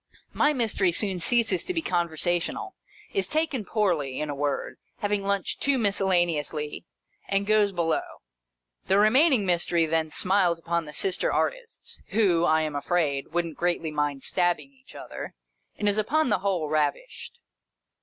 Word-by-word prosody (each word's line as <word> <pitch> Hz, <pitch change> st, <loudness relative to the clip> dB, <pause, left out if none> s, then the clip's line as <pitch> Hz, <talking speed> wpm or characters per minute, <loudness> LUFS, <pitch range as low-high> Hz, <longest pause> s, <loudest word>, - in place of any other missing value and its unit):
My 300 Hz, -, +3 dB
Mystery 220 Hz, -9 st, +1 dB
soon 190 Hz, +1 st, 0 dB
ceases 225 Hz, -2 st, +2 dB
to 365 Hz, -, -3 dB
be 330 Hz, -, 0 dB
conversational 175 Hz, -, -1 dB, 0.2 s
— -, -, -24 dB
is 395 Hz, -, 0 dB
taken 305 Hz, -6 st, -1 dB
poorly, 175 Hz, -, 0 dB
in 150 Hz, -1 st, -2 dB
a -, -, -4 dB
word, 145 Hz, 0 st, -2 dB, 0.2 s
having 205 Hz, -1 st, -1 dB
lunched 200 Hz, -1 st, -1 dB
too 280 Hz, -1 st, +2 dB
miscella 195 Hz, -5 st, +2 dB
neously— 150 Hz, -1 st, -4 dB, 0.4 s
and 195 Hz, 0 st, 0 dB
goes 210 Hz, -1 st, +3 dB
below. 170 Hz, -3 st, 0 dB, 0.9 s
The 190 Hz, -, +3 dB
remaining 245 Hz, +3 st, +4 dB
Mystery 175 Hz, -2 st, +2 dB
then 160 Hz, 0 st, 0 dB
smiles 180 Hz, 0 st, +2 dB
upon 170 Hz, 0 st, -2 dB
the 150 Hz, -, -10 dB
sister 185 Hz, +4 st, 0 dB
artists -, -, -3 dB
(who, 190 Hz, -5 st, +2 dB
I 160 Hz, 0 st, +3 dB
am 155 Hz, -2 st, -3 dB
afraid, 145 Hz, -2 st, 0 dB
wouldn't 170 Hz, -2 st, -2 dB
greatly 175 Hz, -2 st, 0 dB
mind 145 Hz, -2 st, -2 dB
stabbing 175 Hz, +8 st, 0 dB
each 265 Hz, 0 st, -19 dB
other), -, -, -8 dB, 0.4 s
and 210 Hz, -, -1 dB
is 205 Hz, +1 st, +2 dB
upon 300 Hz, +7 st, +1 dB
the -, -, +2 dB
whole 185 Hz, -5 st, -1 dB
ravished. 155 Hz, -, -2 dB
180 Hz, 155 wpm, -26 LUFS, 160-210 Hz, 0.9 s, remaining